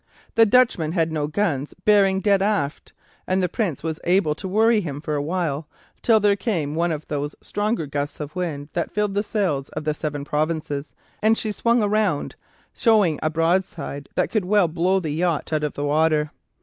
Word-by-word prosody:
The 225 -1 +5
Dutchman 205 -9 +3
had 165 -3 +1
no 150 -2 -1
guns 150 -4 -1
bearing 195 -2 +4
dead 200 -2 +3
aft, 195 -8 -1 0.4
and 185 +1 +1
the - - +3
Prince 180 - -2
was 160 -1 -3
able 175 -3 +2
to 190 +5 -7
worry 220 +3 +3
him 145 -6 -5
for 150 0 -4
a 145 - 0
while, 155 -2 -2 0.3
till 225 -2 +4
there 205 -1 +3
came 185 -9 -2
one 170 +2 0
of 155 -1 -5
those 145 0 -3
stronger 205 -5 -2
gusts 145 0 -4
of 150 +2 -6
wind 155 -5 -3
that 170 - -1
filled 210 -1 -1
the 200 - +1
sails 185 -11 -1
of 155 - -5
the 155 0 0
"Seven 145 -1 -4
Provinces," 150 -1 -2 0.3
and 220 +1 +4
she 215 - -2
swung 235 +2 +2
round, 205 -8 0 0.4
showing 210 - +3
a 155 - +1
broadside 165 -3 -1
that - - 0
could 210 -5 0
blow 185 -1 +2
the 160 -5 -3
yacht 165 0 -1
out 155 -1 +1
of 150 - -1
the 145 - -3
water. 150 0 +2
165 Hz, 190 wpm, -23 LUFS, 150-205 Hz, 0.4 s, The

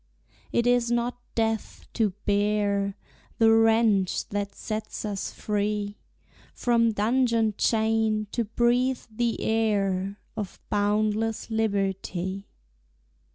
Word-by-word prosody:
It 235 - +1
is 245 -1 +3
not 240 +1 -1
death 225 -1 -1
to 220 -3 +2 0.2
bear 205 -1 +1 0.4
The 225 -1 +5
wrench 225 -4 +3
that 200 -1 -3
sets 215 0 -5
us 200 -2 -3
free 210 0 -2 0.6
From 230 -2 +2
dungeon 230 0 +2
chain, 220 -1 +1
to 235 - -1
breathe 245 +3 +1
the 235 +1 -1
air 200 -3 0 0.2
Of 210 -4 -5
boundless 215 +2 0
liberty. 195 -3 -1
215 Hz, 100 wpm, -26 LUFS, 205-230 Hz, 0.6 s, The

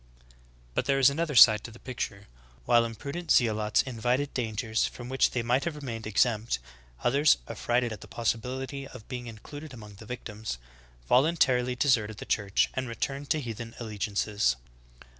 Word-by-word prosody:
''^ - - -28 0.2
(Vs) - - -26 0.4
But - - 0
there 135 -1 +2
is 135 0 +6
another 155 0 -2
side 110 -3 +8
to - - -7
the 115 - -13
picture. 110 -5 -5 0.4
While 120 -1 +4
impru 140 +6 -7
dent 175 -1 -6
zealots 110 -3 +3
invited 125 +3 -1
dangers 110 -2 0
from 120 0 -9
which 135 0 +3
they 120 - -2
might 125 +3 +2
have 170 -3 -2
remained 120 -7 -6
exempt, 110 - +1 0.5
others, 140 +5 +4
affrighted 120 -1 0
at 105 - -10
the - - -10
possibility 130 +4 -3
of 125 -5 -12
be 125 - -4
ing 120 -1 -8
included 140 +6 -9
among 105 -3 -11
the 110 - -11
victims, 110 - -5 0.5
voluntarily 125 - +3
deserted 115 -6 +2
th - - -8
Church 100 -2 +1
and 130 0 -2
returned 135 +5 -4
to 155 - +2
heathen 115 -3 -6
allegiances. 105 - 0
120 Hz, 175 wpm, -28 LUFS, 110-135 Hz, 0.5 s, side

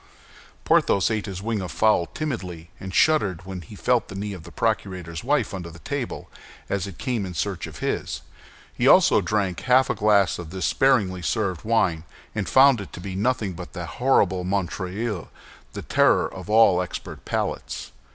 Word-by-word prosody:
Porthos 100 +3 +3
ate 110 -1 -2
his 95 -1 -6
wing 110 -2 -1
of 90 - -5
the - - -11
fowl 110 -6 +3
timidly, 90 - -5
and 95 - -7
shuddered 95 - +2
when 95 -1 -6
he 90 +6 -12
felt 120 +2 +1
the 95 - -9
knee 100 +1 -4
of 90 - -8
the 85 +1 -12
procurator's 90 -6 -2
wife 135 -4 +1
under 90 -3 -5
the 85 - -12
table, 135 +7 -5 0.4
as 100 -1 -1
it 95 - -9
came 125 -6 -2
in 90 -2 -6
search 95 0 -2
of - - -10
his. - - -2 0.5
He - - +1
also - - +6
drank 100 -5 -1
half 130 +1 +3
a - - +1
glass 100 -4 +3
of 85 -3 -7
this 95 +2 -3
sparingly 100 -9 +2
served 95 -4 -1
wine, 95 -8 +1 0.3
and 105 - -2
found 130 -3 +6
it 100 - -9
to - - -7
be 95 +1 -6
nothing 105 -2 0
but 90 0 -9
that 90 +5 -7
horrible 95 -8 +3
Montreuil—the 95 +2 -4
terror - - +3
of - - -9
all 105 -5 +5
expert 90 - -7
palates. - - -3
100 Hz, 180 wpm, -24 LUFS, 90-110 Hz, 0.5 s, also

